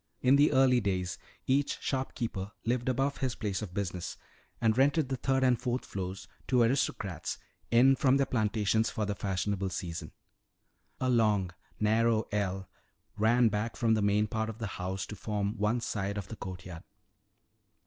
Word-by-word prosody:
In 130 +2 +6
the 145 +2 +5
early 130 -2 +5
days 90 -4 -2 0.3
each 140 +2 +1
shopkeeper 115 -7 -3
lived 120 +2 0
above 135 +2 0
his 130 -4 -1
place 100 -2 -2
of 95 -4 -7
business 90 -3 -3 0.4
and 110 -2 +3
rented 140 +2 +3
the 135 - 0
third 130 +1 +1
and 125 -2 +3
fourth 125 +1 -1
floors 95 0 -5 0.2
to 125 -2 +4
aristocrats 115 - -1 0.3
in 130 +3 +6
from 135 0 +3
their 140 - +2
plantations 110 -2 +1
for 110 - -2
the 105 - -1
fashionable 100 0 -1
season. 85 -3 -5 0.9
A 130 - 0
long, 105 -7 +2 0.3
narrow 110 +1 +2
ell 95 -2 -1 0.5
ran 115 +2 +4
back 105 +2 -2
from 115 -2 +2
the 110 - +2
main 105 +1 +3
part 110 +1 -2
of 110 - -7
the 115 - -4 0.2
house 95 +1 -2
to 105 - -8
form 105 0 -2
one 105 +4 +2
side 100 -2 -2
of 100 -3 -5
the 115 - -6
courtyard. 90 -4 -7
110 Hz, 165 wpm, -30 LUFS, 100-125 Hz, 0.9 s, In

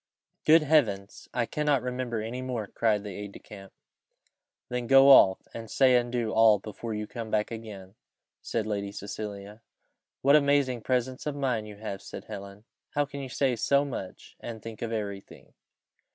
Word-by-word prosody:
"Good 160 +1 +6
Heavens! 110 -10 +1
I 120 - 0
cannot 145 -1 0
remember 125 -3 -3
any 120 +3 -5
more," 125 -4 -3
cried 105 0 0
the 100 -2 -6
aide 100 +1 -7
de - - -9
camp. 95 -2 -12 1.0
"Then 125 -1 -3
go 135 +1 +7
off, 95 -8 +6
and 115 -1 -8
say 130 +1 +4
and 120 -1 +1
do 120 -3 -1
all 110 -1 +6
that 100 - -19
before 110 +1 -6
you 105 0 -3
come 115 0 -7
back 105 +1 0
again," 105 -4 -8 0.5
said 110 -2 -2
Lady 100 -2 -3
Cecilia. 100 +1 -7 0.6
"What 140 +2 +6
amazing 140 -4 +3
presence 130 +3 -1
of 150 - -2
mind 125 -6 -1
you 105 - -9
have!" 100 -2 -6
said - - -9
Helen. 100 -1 -9 0.3
"How 145 0 +2
can 140 0 -8
you 135 -1 -6
say 130 +1 +1
so 140 +5 +2
much, 120 -9 -7
and 115 -2 -7
think 110 0 -9
of 115 - -3
every 100 -3 -3
thing!" - - -17
115 Hz, 180 wpm, -28 LUFS, 105-130 Hz, 1.0 s, go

